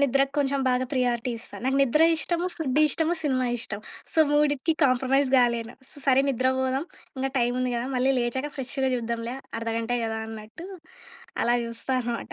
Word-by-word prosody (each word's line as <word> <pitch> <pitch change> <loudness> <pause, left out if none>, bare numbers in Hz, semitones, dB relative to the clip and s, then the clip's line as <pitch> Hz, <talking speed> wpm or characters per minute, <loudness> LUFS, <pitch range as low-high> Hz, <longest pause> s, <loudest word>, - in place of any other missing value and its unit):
నిద్రకు 275 0 +2
కొంచెం 275 -1 +1
బాగా 250 0 +2
ప్రియారిటీ 245 -2 0
ఇస్తా. 230 - -9
నాకు 265 +1 +1
నిద్ర 275 +4 +4
ఇష్టము. 345 +3 -1
ఫుడ్డు 300 -3 +1
ఇష్టము, 320 +3 0
సినిమా 260 -3 +1
ఇష్టం. 210 -2 -5 0.3
సో, - - -2
మూడిటికి 295 +1 +2
కాంప్రమైజ్ 265 +2 +2
గాలేను. 235 -1 +2
స - - -9
సరే 265 0 +5
నిద్ర 255 0 +1
బోదాం 260 +3 0 0.3
ఇంకా 270 0 -1
టైం 240 0 +2
ఉంది 255 -1 0
గదా! 235 +2 -2
మళ్ళీ 255 +2 +2
లేచాక 260 +4 -1
ఫ్రెష్‌గా 265 0 -2
చూద్దాంలే 235 0 -3 0.2
అర్ధగంటే 230 +1 -1
కదా 220 0 -2
అన్నట్టు 220 +9 -9 0.8
అలా 240 +1 +3
చూస్తా 230 +3 -4
అనమాట. 240 -1 -4
255 Hz, 165 wpm, -26 LUFS, 235-275 Hz, 0.8 s, సరే